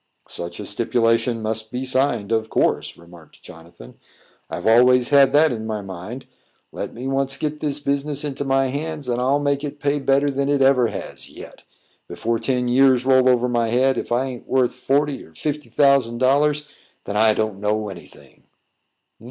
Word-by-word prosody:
"Such 85 0 -7
a - - -6
stipulation 115 0 0
must 110 0 -4
be 125 +1 -3
signed, 130 -5 0
of 110 -1 0
course," - - 0
remarked 85 -2 -17
Jonathan. 80 -7 -14 0.5
"I've - - -6
always 125 +2 +5
had 140 -1 +5
that 155 +1 +5
in 110 -2 -5
my 105 -2 -4
mind; 95 +7 -8 0.5
let - - -6
me 125 +3 -7
once 135 0 -1
get 150 0 -3
this 145 -2 -2
business 140 +1 -2
into 140 -2 -4
my 135 -1 +1
hands, 150 +1 -5
and 120 0 -1
I'll 135 +3 +2
make 145 0 -1
it 145 0 -6
pay 145 0 0
better 140 +1 +2
than 140 +1 -1
it 140 -1 +2
ever 130 -3 +4
has - - -7
yet. - - -12 0.5
Before 115 0 -2
ten 125 +2 -1
years 130 0 +4
roll 130 -1 +4
over 125 -1 +2
my 120 -2 0
head, 130 +3 +2
if 120 - -5
I 125 +3 +1
a'n't 125 -3 -8
worth 130 -2 +1
forty 140 +3 -1
or 80 - -19
fifty 150 - -4
thousand 140 -5 +3
dollars, 145 +4 +2 0.4
then 100 - -5
I 110 0 +4
don't 110 -3 -2
know 105 +1 -1
any 90 -3 -10
thing." - - -20
130 Hz, 185 wpm, -21 LUFS, 115-140 Hz, 0.5 s, always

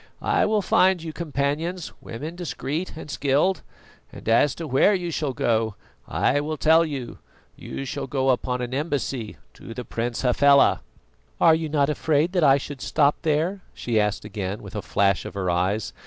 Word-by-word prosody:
"I - - +2
will 210 -1 +1
find 185 -2 +3
you 160 -1 -6
companions, 160 +3 -2
women 150 +9 -7
discreet 165 -1 -4
and - - -8
skilled. 145 +6 +1 0.5
And - - -12
as 115 +5 +3
to 165 - -6
where 145 +9 +4
you 175 -2 -3
shall 150 -4 -2
go, 110 -3 0 0.3
I 145 +2 +1
will 155 +1 -3
tell 160 +4 +5
you. 140 -7 -5 0.4
You 135 - -6
shall 135 - -4
go 135 0 +1
upon 125 0 -1
an 120 +1 -5
embassy 135 -6 -3 0.2
to 115 - -10
the 125 - -6
Prince 120 +2 -3
Hafela." 140 +3 +4 0.6
"Are 165 - +6
you 160 -1 -1
not 145 -2 +2
afraid 150 +2 +1
that 180 -3 +1
I 135 -2 +6
should 140 -1 -7
stop 145 +1 +2
there?" 165 +5 0
she 115 -3 0
asked 105 0 -1
again, 100 -1 -5
with - - -10
a - - -2
flash 100 -2 +1
of - - -8
her 95 -2 -1
eyes. 95 +4 -1
140 Hz, 180 wpm, -24 LUFS, 120-160 Hz, 0.6 s, Are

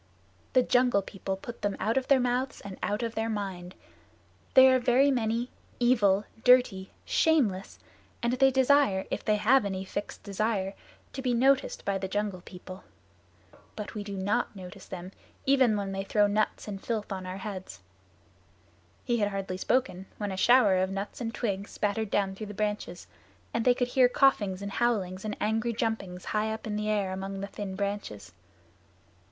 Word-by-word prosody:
"The 255 - +5
Jungle 245 -5 +3
People 195 -1 -5
put 235 +4 -9
them 205 -1 -1
out 225 - 0
of 265 -1 0
their 275 -2 +5
mouths 250 +1 -1
and 195 -2 -8
out 210 +3 -1
of 230 -1 -2
their 225 0 -2
minds. 190 -4 -4 0.8
They 260 0 +9
are 255 - +4
very 255 +3 +4
many, 235 0 -1 0.3
evil, 215 -5 +3 0.2
dirty, 245 -7 +4 0.2
shameless, 235 - +1 0.5
and 235 +1 +1
they 270 +1 +5
desire, 265 -6 +3
if - - -3
they 215 - +2
have 230 +5 +4
any 190 -1 -3
fixed 205 - -6
desire, 200 -1 -1 0.4
to 265 - -5
be 250 -2 0
noticed 270 +3 +2
by 195 -1 0
the 190 - -3
Jungle 200 -1 -2
People. 185 +1 -11 0.9
But 210 - -6
we 210 -2 -4
do 200 -1 -6
not 205 +4 -1
notice 190 0 -10
them 185 0 -7 0.3
even 260 -5 +4
when 200 -1 -3
they 195 0 -3
throw 205 +1 +3
nuts 210 +2 0
and 195 -2 -6
filth 220 -3 -3
on 190 -1 -4
our 185 +1 -5
heads." 195 -2 -7 1.2
He 240 -2 +1
had 205 -2 +1
hardly 195 -2 -4
spoken 190 -3 0
when 205 -2 -3
a - - -3
shower 205 -2 +5
of 185 0 +1
nuts 195 +5 -5
and 225 -1 -2
twigs 200 -4 -3
spattered 210 +1 -2
down 195 -2 0
through 210 +2 -7
the 210 - -8
branches; 210 -4 -3 0.5
and 230 - -1
they 250 -1 +5
could 245 0 -1
hear 250 0 +4
coughings 205 -8 +2
and 200 - -4
howlings 195 -6 0
and 215 -1 -4
angry 225 +2 0
jumpings 215 -6 -3
high 215 +1 +1
up 220 - -5
in 215 -1 -3
the 210 0 -2
air 200 -3 0
among 195 +1 -5
the - - -2
thin 200 -1 -6
branches. 190 - -4
210 Hz, 180 wpm, -28 LUFS, 195-240 Hz, 1.2 s, They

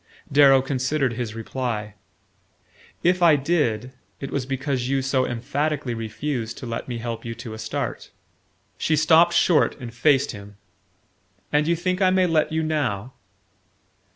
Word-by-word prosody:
Darrow 135 -2 +6
considered 135 0 0
his 115 -2 -4
reply. 115 -2 -4 1.1
"If 180 +1 +2
I 165 -3 +6
did, 135 -6 0 0.3
it 135 - -6
was 135 -2 -2
because 135 -1 -2
you 135 -1 +1
so 130 -1 +1
emphatically 140 +2 -2
refused 115 +1 -4
to - - -7
let 115 -1 -5
me 120 -2 -4
help 115 -1 -5
you 115 -1 -5
to 115 -1 -8
a 110 - -8
start." 110 0 -4 0.7
She 160 - +1
stopped 165 +3 +5
short 165 -4 +3
and 120 -3 -8
faced 135 +3 +2
him 100 -2 -11 1.0
"And 150 +1 +3
you 170 - +3
think 185 +3 -2
I 185 - +5
may 185 0 +3
let 160 -2 +1
you 160 0 0
now?" 130 -7 -2
135 Hz, 155 wpm, -23 LUFS, 115-155 Hz, 1.1 s, Darrow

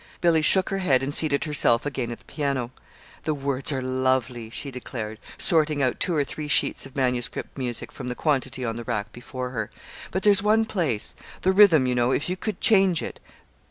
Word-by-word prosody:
Billy 165 -2 +3
shook 185 +4 +5
her 195 - -2
head 135 -8 +2
and 140 +2 -2
seated 145 -3 +4
herself 145 -6 +2
again 130 -4 -3
at 120 - -5
the - - -21
piano. 140 -5 -2 0.5
"The 155 - -1
words 140 0 -2
are 130 -2 -2
lovely," 130 -3 -1
she 140 +4 -4
declared, 115 -4 -6 0.2
sorting 155 -3 +2
out 130 - 0
two 175 - 0
or 145 - +2
three 150 +2 -6
sheets 145 - +1
of 135 - -19
manuscript 125 -3 -2
music 125 -3 -4
from - - -8
the 125 - -3
quantity 130 -4 -1
on 115 -1 -3
the 120 - -3
rack 110 -3 -3
before 125 +1 -6
her. 110 -4 -3 0.4
"But 190 +1 -3
there's 205 -2 +6
one 215 +2 +3
place 160 - -1 0.3
the 190 - +3
rhythm, 190 -8 +6
you 125 - +1
know 120 0 +2
if 145 +5 0
you 180 - -1
could 205 +1 -4
change 190 -5 +3
it. - - -7
135 Hz, 205 wpm, -25 LUFS, 125-160 Hz, 0.5 s, there's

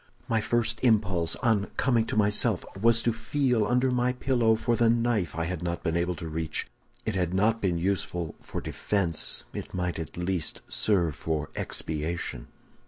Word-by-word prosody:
"My 115 -1 +1
first 120 0 0
impulse, 100 -8 +2
on 110 -4 +2
coming 120 -4 +2
to - - -2
myself, 105 -1 +3
was 115 +3 +3
to 120 - +2
feel 120 -1 +1
under 125 +2 +2
my 125 0 +1
pillow 120 -3 +2
for 120 +1 0
the 115 0 +3
knife 115 -8 +1
I 85 - -1
had 90 0 -3
not 85 0 -3
been 80 -2 0
able 85 +1 0
to 85 -1 -6
reach; 80 0 -2 0.4
if 110 - -1
it - - -2
had 90 0 0
not 110 +4 +2
been 90 -3 +1
useful 90 -2 -1
for - - -5
defense, 90 -6 -1
it - - -6
might 90 -2 -2
at 80 0 -7
least 90 -2 -1
serve 90 -7 +2
for 75 0 -3
expiation. 80 -5 -3
100 Hz, 175 wpm, -28 LUFS, 85-115 Hz, 0.4 s, myself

